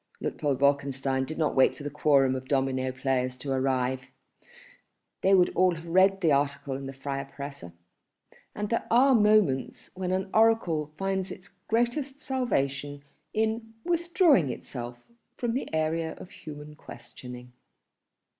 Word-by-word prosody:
Luitpold 145 -3 -1
Wolkenstein 135 -1 +1
did 155 - -6
not 155 -2 +1
wait 130 - +4
for - - -10
the 145 - -4
quorum 140 -3 +3
of 130 0 -5
domino 130 -1 0
players 130 -1 -1
to 135 +2 -5
arrive. 130 -1 0 1.1
They 195 +1 +5
would 180 -2 +4
all 180 -1 +3
have 165 +1 -10
read 190 +3 +4
the 165 -4 +3
article 140 -1 0
in 135 0 -6
the - - -5
Freie 135 0 -4
Presse. 140 -2 -7 0.9
And 210 0 -3
there 230 - 0
are 260 +4 +5
moments 210 - +2
when 185 -1 -3
an 190 +1 -1
oracle 200 -10 +3
finds 195 0 -1
its 180 - -10 0.2
greatest 245 +5 0
salvation 145 - -2 0.3
in 220 +1 -1
withdrawing 340 - +3
itself 120 -1 -6 0.4
from 240 -2 -1
the 260 - -3
area 160 +1 -1
of 180 - -12
human 150 -1 -10
questioning. 125 -4 -11
150 Hz, 145 wpm, -28 LUFS, 135-195 Hz, 1.1 s, They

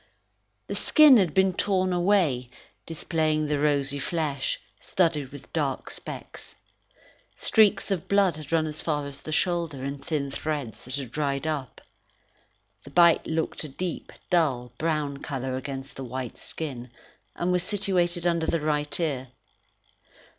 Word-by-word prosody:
The - - -5
skin 300 -5 +7
had 185 -6 +3
been 190 0 +4
torn 185 -1 +1
away, 175 -9 +2 0.4
displaying 155 -1 0
the 150 -1 0
rosy 140 -1 +2
flesh, 145 -3 -1 0.2
studded 155 -7 0
with 145 -1 -12
dark 145 -5 -1
specks. - - -8 0.8
Streaks 215 -1 +3
of 185 -4 -1
blood 200 -4 +3
had 155 -1 -9
run 160 -1 +3
as 155 0 -4
far 150 -3 -1
as 140 -1 -7
the 155 - -7
shoulder 165 -5 0
in 140 0 -4
thin 140 -2 -2
threads 145 -5 -4
that 130 +1 -4
had 135 -4 -5
dried 140 0 -1
up. 150 -5 -3 1.0
The - - -11
bite 170 -2 +5
looked 160 0 -1
a 155 - -5
deep, 175 +5 -5 0.2
dull 135 -9 +2
brown 150 -3 0
colour 130 -2 -4
against 135 0 -6
the 135 - -5
white 130 -1 -5
skin, 130 -6 -6 0.5
and 175 +1 0
was 180 0 +2
situated 180 -3 0
under 170 -2 +1
the 165 - +1
right 150 -1 0
ear. 140 -6 -1
155 Hz, 145 wpm, -26 LUFS, 140-175 Hz, 1.0 s, skin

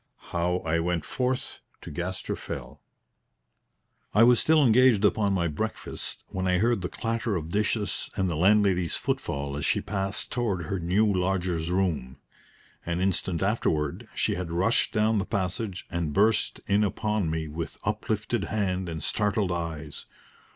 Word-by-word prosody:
II - - -17
HOW 90 +1 +1
I 80 +1 +1
WENT 85 0 -1
FORTH 130 0 -2 0.2
TO - - -9
GASTER 90 +4 -3
FELL - - -7 1.3
I 105 - +7
was 120 0 +6
still 155 -2 +4
engaged 120 -3 +5
upon 105 -1 +2
my 90 -3 +1
breakfast 75 - -4
when 95 0 -2
I 90 0 +3
heard 115 +1 +2
the 90 - -3
clatter 115 -2 -2
of 80 -1 -4
dishes 105 -1 0
and 95 -1 +1
the 85 - -1
landlady's 95 -1 +3
footfall 70 0 -2
as 75 - -3
she - - +2
passed 95 -1 -3
toward 105 -8 -1
her 95 +5 -2
new 90 +6 +2
lodger's 90 -4 0
room. 85 -9 -1 0.7
An 85 0 -2
instant 95 -2 0
afterward 80 -8 0
she - - +1
had 90 -1 -4
rushed 95 +8 +2
down 110 -1 +2
the - - 0
passage 95 0 -2
and 85 -4 -2
burst 110 +5 +2
in 100 +2 +3
upon 105 -2 0
me 80 0 -2
with 80 +1 -5
uplifted 105 +2 -1
hand 95 -4 -1
and 80 -2 -5
startled 105 -3 +1
eyes. 80 -4 -5
95 Hz, 160 wpm, -27 LUFS, 85-105 Hz, 1.3 s, I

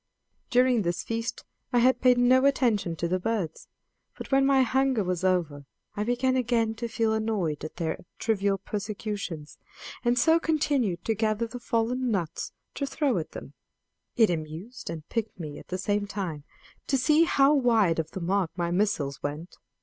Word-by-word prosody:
During 250 -2 +4
this 175 -1 -1
feast 230 +1 -4 0.3
I 245 - +2
had 255 +2 +4
paid 250 -1 +5
no 255 +2 +5
attention 230 -11 +2
to 170 - -2
the 185 +2 0
birds, 185 -5 -3 0.5
but - - -8
when 270 0 +4
my 270 -1 +5
hunger 260 -3 +1
was 180 -1 -2
over 160 -7 0 0.3
I 210 0 -2
began 245 +3 +1
again 235 -3 +1
to 235 +1 -3
feel 225 -1 0
annoyed 210 -10 -1
at 155 - -6
their 165 -2 -3
trivial 200 -3 +1
persecutions, 200 -6 -5 0.4
and 240 0 +2
so 320 +7 +5
continued 285 - 0
to 225 - +2
gather 215 +1 0
the 240 +2 -8
fallen 240 +2 0
nuts 180 -8 -2 0.2
to 280 - -3
throw 270 - 0
at 155 - -7
them. - - -9 0.6
It 225 -5 +4
amused 165 +10 -6
and 160 -2 -6
piqued 220 -4 -3
me 150 -3 -6
at - - -14
the 185 - -3
same 205 +1 -1
time 175 -8 -5 0.4
to 270 - +2
see 305 +5 +4
how 280 -3 +4
wide 225 - +3
of 160 -1 -2
the 190 - -6
mark 185 0 +1
my 170 -1 -1
missiles 175 -8 0
went. 150 +5 -6
215 Hz, 175 wpm, -27 LUFS, 175-245 Hz, 0.6 s, paid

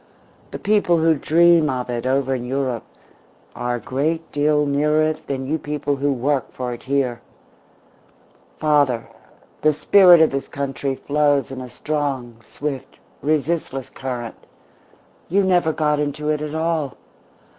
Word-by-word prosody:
The - - -6
people 205 -5 +2
who 160 0 +4
dream 165 +1 +4
of 125 -2 -2
it 120 0 -3
over 135 0 +1
in 125 -2 -3
Europe 130 -2 -2 0.7
are 120 0 -2
a - - -4
great 155 +8 -2
deal 150 0 +2
nearer 150 +2 +2
it 155 0 -2
than 135 -1 -3
you 155 +4 -1
people 145 -1 -2
who 140 +1 +1
work 135 +1 -1
for 125 -1 -4
it 120 - -9
here. 130 -3 -1 1.4
Father, 145 -6 +2 0.6
the 155 0 +4
spirit 175 +4 +6
of 160 - +5
this 135 0 -3
country 140 -1 -3
flows 145 -1 +1
in 130 -1 -6
a 125 - -8
strong, 135 -5 -3
swift, 140 -3 -6 0.2
resistless 150 -3 -1
current. 125 -3 -6 0.8
You 195 +4 +3
never 175 -4 +3
got 150 -1 0
into 150 +1 -2
it 150 -1 0
at 150 0 -4
all. 160 -3 -1
145 Hz, 145 wpm, -21 LUFS, 130-155 Hz, 1.4 s, spirit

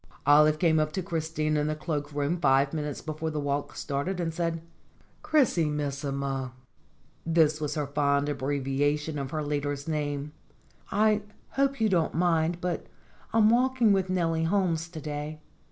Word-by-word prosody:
Olive 150 +1 +6
came 160 -2 +3
up 155 0 0
to 190 - -2
Christina 160 -3 -1
in 150 - 0
the 155 - -1
cloak 150 -2 -3
room 145 +4 -1
five 135 -2 +3
minutes 150 -3 -3
before 155 +1 -3
the 155 -1 -3
walk 145 0 -2
started, 145 +7 -2
and 165 -2 -1
said: 165 -1 -2 0.6
"Chrisi 250 - +2
missima" 140 -3 -3 0.7
this 160 -2 +2
was 150 +1 -2
her 150 -2 -1
fond 140 0 +1
abbreviation 145 +2 -1
of 135 -1 -4
her 155 +1 -2
leader's 145 0 -2
name 145 -2 -2 0.6
"I 215 +1 +3 0.3
hope 275 -1 +1
you 220 - +3
don't 170 -7 +1
mind, 170 0 +2
but 175 -1 -3 0.4
I'm 220 -1 +5
walk 260 +2 +2
ing 220 -4 +5
with 190 -1 +1
Nellie 165 -3 +1
Holmes 170 -3 0
to 165 -2 -8
day. 150 +1 -5
155 Hz, 160 wpm, -28 LUFS, 145-170 Hz, 0.7 s, Olive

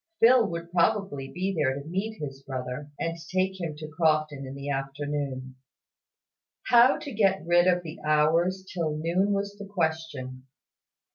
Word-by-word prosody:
Phil 240 0 +6
would 170 0 -6
probably 175 -6 +1
be 190 +2 -2
there 145 -6 +1
to 140 +1 -7
meet 200 +6 -3
his 135 -2 -6
brother, 130 +1 -5
and 165 0 -1 0.2
take 190 0 0
him 160 -3 -3
to 155 +1 -7
Crofton 155 -3 0
in 135 - -7
the 140 0 -7
afternoon. 135 -1 -3 1.1
How 245 +2 +7
to 285 - -7
get 195 -3 +2
rid 175 +1 +4
of 180 -1 +3
the 160 0 -8
hours 165 +5 +2
till 160 -4 -1
noon 175 +6 +1
was 200 0 -1
the 205 - -7
question. 160 -8 -3
160 Hz, 155 wpm, -27 LUFS, 145-190 Hz, 1.1 s, How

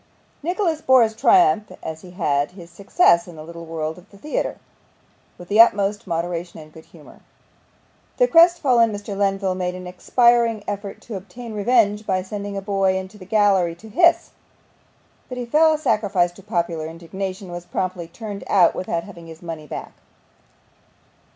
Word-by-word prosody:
Nicholas 340 -1 -1
bore 260 -2 +5
his 220 -1 -1
triumph, 225 - +4
as 160 0 -6
he 180 - -12
had 150 -5 -1
his 175 -3 -13
success 185 - +3
in 175 - -11
the 155 - -9
little 170 +1 -10
world 160 0 -4
of 180 - -20
the 200 - -17
theatre, 295 +10 -3 0.8
with 175 - -12
the 210 +3 +6
utmost 205 -1 +2
moderation 170 0 -3
and 155 0 -14
good 160 - -14
humour. - - -17 1.0
The - - +4
crestfallen 310 - +5
Mr. 205 0 -6
Lenville 195 -1 0
made 180 -1 -3
an 185 0 -8
expiring 230 +4 +2
effort 205 -1 -5
to 225 - -8
obtain 220 +5 -9
revenge 210 -1 +2
by 185 -2 0
sending 200 +1 -6
a 195 - -5
boy 195 -2 +1
into 190 +3 -8
the 185 - -11
gallery 195 -4 +2
to 220 +6 -14
hiss, 340 - +3 1.0
but 250 - -6
he 245 - -4
fell 310 +6 +4
a - - 0
sacrifice 205 - +1
to 175 - -16
popular 170 -3 -2
indignation, 185 +4 -6
and - - -8
was 175 0 -7
promptly 180 -2 -3
turned 205 +3 -8
out 180 -4 +4
without 170 -2 -3
having 175 -5 -12
his 165 +1 -12
money 160 -3 -7
back. - - -7
195 Hz, 170 wpm, -22 LUFS, 175-220 Hz, 1.0 s, the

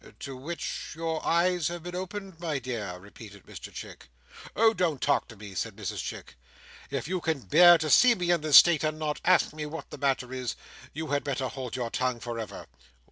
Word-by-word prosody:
"To 135 -1 -6
which 155 +7 -5
your 160 0 -3
eyes 175 -1 +2
have 175 -1 -5
been 175 0 -7
opened, 190 -1 -6
my 160 -4 -2
dear!" 110 -9 -5
repeated 100 +1 -13
Mr - - -10
Chick. - - -10 0.5
"Oh, 225 0 +5
don't 165 -9 0
talk 140 +2 +1
to 115 - -12
me!" 100 -1 -10
said 90 - -3
Mrs - - -5
Chic 60 - -7 0.5
"if - - -3
you 185 0 -2
can 160 -5 -1
bear 175 +6 +7
to 160 -1 -3
see 240 - +6
me 175 -3 0
in 170 -2 +2
this 150 -2 +7
state, 170 -4 +7
and 155 0 -1
not 155 -1 -3
ask 185 -3 +3
me 155 -1 -5
what 160 +2 -8
the - - -8
matter 130 -2 0
is, 130 -2 -3 0.4
you 160 +1 -5
had 145 0 0
better 135 -2 -2
hold 130 -3 -6
your 120 -3 -3
tongue 125 -2 -1
for 120 0 -5
ever." 110 - -7
150 Hz, 210 wpm, -28 LUFS, 125-175 Hz, 0.5 s, bear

